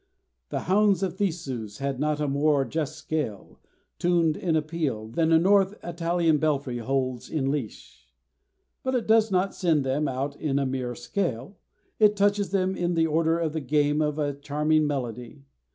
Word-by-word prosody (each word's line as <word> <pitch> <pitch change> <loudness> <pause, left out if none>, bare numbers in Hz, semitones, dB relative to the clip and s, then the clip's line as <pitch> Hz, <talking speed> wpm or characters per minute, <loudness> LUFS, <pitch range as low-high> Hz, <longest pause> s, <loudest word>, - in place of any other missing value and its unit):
The - - -2
hounds 200 +1 +3
of 190 -1 -2
Theseus 135 - -3
had 140 -1 -3
not 150 0 0
a 150 - 0
more 140 0 +2
just 155 +3 -3
scale, 150 -9 -4 0.4
tuned 170 -3 +2
in 180 -6 -1
a 155 - +3
peal, 150 -9 -3
than 160 +8 0
a 165 - +7
North 195 +3 +3
Italian 170 -2 +1
belfry 140 -5 -1
holds 130 0 -2
in 135 -3 0
leash. 110 - -6 0.7
But 260 0 -1
it 245 - 0
does 220 0 +4
not 190 0 +1
send 160 -6 +1
them 135 +3 0
out 135 +2 -3
in 140 -2 -1
a 140 - +1
mere 130 -2 -3
scale, 135 - -3 0.4
it 210 -1 +5
touches 205 0 +2
them 190 -1 0
in 175 -1 -1
the 165 0 +3
order 160 +1 +2
of 165 -3 -1
the 160 - -2
game 145 +2 +1
of 150 -1 0
a 145 -2 -1
charming 150 +2 +1
melody. 125 0 -5
155 Hz, 175 wpm, -26 LUFS, 135-175 Hz, 0.7 s, a